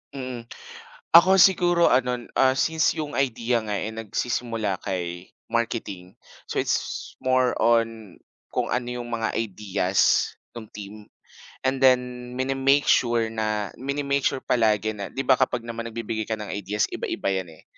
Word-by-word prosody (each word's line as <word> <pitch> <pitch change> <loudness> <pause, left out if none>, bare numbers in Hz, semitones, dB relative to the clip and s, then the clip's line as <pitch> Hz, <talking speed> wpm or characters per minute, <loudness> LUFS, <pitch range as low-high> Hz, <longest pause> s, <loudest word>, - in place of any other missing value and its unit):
Mm, 125 -3 -6 0.7
ako 190 +1 +6
siguro 175 -2 +5
ano, 125 -1 0 0.2
since, 160 +3 +2
yung 150 -2 -4
idea 125 -3 +1
nga 105 - -3
eh, 105 - -2
nagsisimula 115 -2 -2
kay 90 -1 -4 0.2
marketing, 110 -6 -3 0.3
so, - - -1
it's - - -3
more 130 -1 +1
on, 115 -4 +1 0.4
kung - - -1
ano 125 0 -2
yung 120 - -8
mga 115 -1 -2
ideas, 100 -3 +1 0.2
no'ng 110 -3 -9
team. 100 0 -8 0.7
And 130 0 +1
then, 125 -1 +2
mini-make 135 +2 +2
sure 120 -2 +2
na 110 -2 -2
mini-make 140 +1 -1
sure 130 - -2
palagi 110 -2 +2
na, 100 - -4
'di 135 - -2
ba, 130 - +4
kapag 125 -2 +1
naman 115 0 -6
nagbibigay 110 -1 -4
ka 110 - -1
ng 105 -1 -7
ideas, 105 +2 -1
iba-iba - - -3
'yan, 95 -2 -2
eh. - - -19
115 Hz, 145 wpm, -24 LUFS, 105-130 Hz, 0.7 s, ako